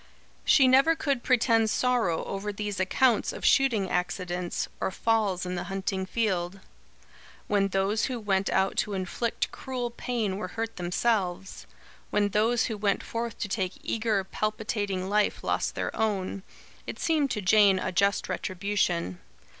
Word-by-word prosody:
She 270 -3 +5
never 270 +6 +5
could 280 -5 -1
pretend 230 -3 +3
sorrow 235 -10 +1
over 200 +1 -3
these 205 -1 -4
accounts 225 +5 +2
of - - -6
shooting 235 -8 +3
accidents, 180 -1 -2
or - - 0
falls 200 -2 0
in 180 - -3
the 175 - -3
hunting 190 -1 -3
field. 190 -4 -1 0.9
When 200 -1 +2
those 195 +3 +1
who 250 -2 -3
went 195 -2 0
out 190 0 +1
to 210 - 0
inflict 195 +5 -2
cruel 250 -2 -4
pain 230 -5 -2
were 200 - -4
hurt 225 0 -3
themselves; 185 0 -1 0.4
when 205 -1 +1
those 220 +3 +2
who 220 - -2
went 205 -1 0
forth 230 0 -4
to - - -1
take 190 -2 -2
eager, 220 -3 0
palpitating 205 -2 -2
life, 210 +1 +1
lost - - -1
their - - -3
own; 200 -3 -1 0.5
it - - -5
seemed 310 -4 +1
to 215 - -2
Jane 200 0 +5
a 185 - -2
just 200 +3 +1
retribution. 180 - -1
205 Hz, 150 wpm, -27 LUFS, 190-230 Hz, 0.9 s, She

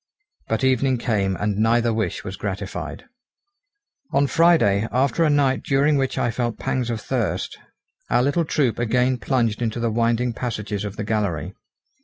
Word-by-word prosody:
But 110 +4 -1
evening 130 0 +2
came 100 -5 0
and 105 +2 -1
neither 115 +1 +3
wish 110 0 -2
was 95 - -6
gratified. 100 0 -5 1.1
On 140 +1 +3
Friday, 140 - +3
after 135 +5 +2
a 160 - +3
night 135 -5 +2
during 145 +2 +2
which 135 -1 0
I 120 - +1
felt 120 -1 -2
pangs 125 -2 -2
of 115 -2 -2
thirst, 120 -1 -2 0.5
our 120 - +3
little 145 +5 +1
troop 135 -7 0
again 125 +2 +1
plunged 115 +1 0
into 115 0 -1
the 115 -1 0
winding 115 +2 +1
passages 105 -4 -4
of 100 0 -5
the 105 - -4
gallery. 105 -8 -2
120 Hz, 160 wpm, -22 LUFS, 105-130 Hz, 1.1 s, neither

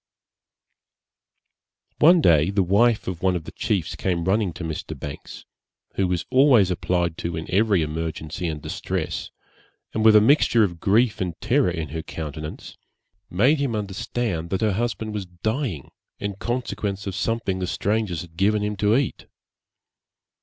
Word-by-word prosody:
One 170 +3 +7
day 80 - +4
the 100 -1 +2
wife 105 +5 +3
of 90 -3 -4
one 95 -1 +2
of 85 - -3
the - - -9
chiefs 95 -7 -2
came 90 -3 -1
running 95 +1 +1
to 80 - -7
Mr. 80 -2 -5
Banks, 70 -1 -8 0.5
who 95 - +1
was 90 -1 -1
always 130 -8 +5
applied 85 -2 -1
to 85 -1 -3
in 80 - -4
every 100 -3 +3
emergency 80 +2 -4
and 75 -2 -3
distress, - - -4 0.6
and 110 - 0
with 110 -1 +7
a - - +10
mixture 120 -1 +4
of 85 -4 -2
grief 110 +4 +2
and 90 -3 -3
terror 120 +2 +2
in 80 -4 -4
her 80 +3 -4
countenance, 75 -1 -7 0.5
made 130 - +3
him 135 -5 -1
understand 100 -3 -3
that 95 - -1
her 110 -2 +2
husband 110 0 -2
was 100 -3 -4
dying, 95 - -3 0.3
in 100 0 -3
consequence 105 -4 -3
of 100 - -3
something 105 -2 -1
the 90 - -2
strangers 100 -4 -1
had 85 -2 -12
given 105 +4 +2
him 105 0 -2
to 105 +2 +3
eat. 140 -2 -2
95 Hz, 160 wpm, -23 LUFS, 85-110 Hz, 0.6 s, a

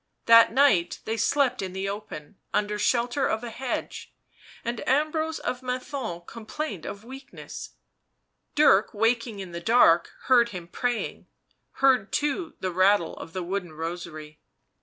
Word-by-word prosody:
That 230 0 +7
night 230 -10 +3
they 220 - -1
slept 255 +2 +1
in 190 -1 -5
the 190 +1 -3
open, 200 -4 -7 0.2
under 210 0 0
shelter 245 +5 +1
of 220 +2 -1
a 235 - -5
hedge, 250 +2 -5 0.5
and 235 -1 -3
Ambrose 310 +3 +1
of 250 - -4
Menthon 250 -7 -4
complained 230 - -6
of 200 +1 -7
weakness; 265 +2 -9 0.8
Dirk, 220 -9 +4
waking 225 0 +1
in 190 -3 -7
the 170 0 -6
dark, 175 -5 +5
heard 240 -2 +4
him 180 -5 -8
praying... 245 +5 -3 0.6
heard, 255 -7 +4
too, 300 +3 -1
the 185 - -1
rattle 185 -1 +3
of 165 - -9
the 185 -1 -3
wooden 180 -2 -4
rosary. 155 -2 -7
220 Hz, 140 wpm, -26 LUFS, 185-255 Hz, 0.8 s, That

